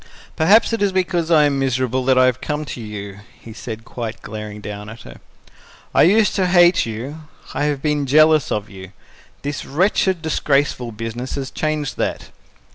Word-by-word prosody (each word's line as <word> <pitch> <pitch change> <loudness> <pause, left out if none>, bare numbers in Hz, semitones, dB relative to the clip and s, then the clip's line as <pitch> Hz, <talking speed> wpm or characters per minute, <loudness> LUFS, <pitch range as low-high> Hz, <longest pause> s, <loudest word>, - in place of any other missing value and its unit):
"Perhaps 205 +9 +4
it 225 - -1
is 200 -1 +2
because 180 -3 0
I 160 -3 +5
am 140 -2 +1
miserable 130 -1 0
that 130 -1 +3
I 130 - +6
have 130 0 0
come 150 0 -3
to 125 - -7
you," 100 -2 -7 0.2
he 115 - -11
said, 115 0 -8
quite 115 -2 -6
glaring 105 -1 -7
down 105 0 -7
at 110 +1 -11
her. - - -12 0.8
"I - - +4
used 215 +1 +3
to 185 -2 +2
hate 175 -4 +4
you; 135 +8 -7 0.3
I 145 - -1
have 145 -2 -2
been 150 -2 0
jealous 155 +1 +4
of 105 0 -2
you. 95 -2 -12 0.5
This 145 -1 -4
wretched, 185 +2 +1
disgraceful 140 -5 0
business 115 +3 -5
has 135 -2 -5
changed 155 -3 -2
that. - - -3
135 Hz, 180 wpm, -20 LUFS, 115-160 Hz, 0.8 s, I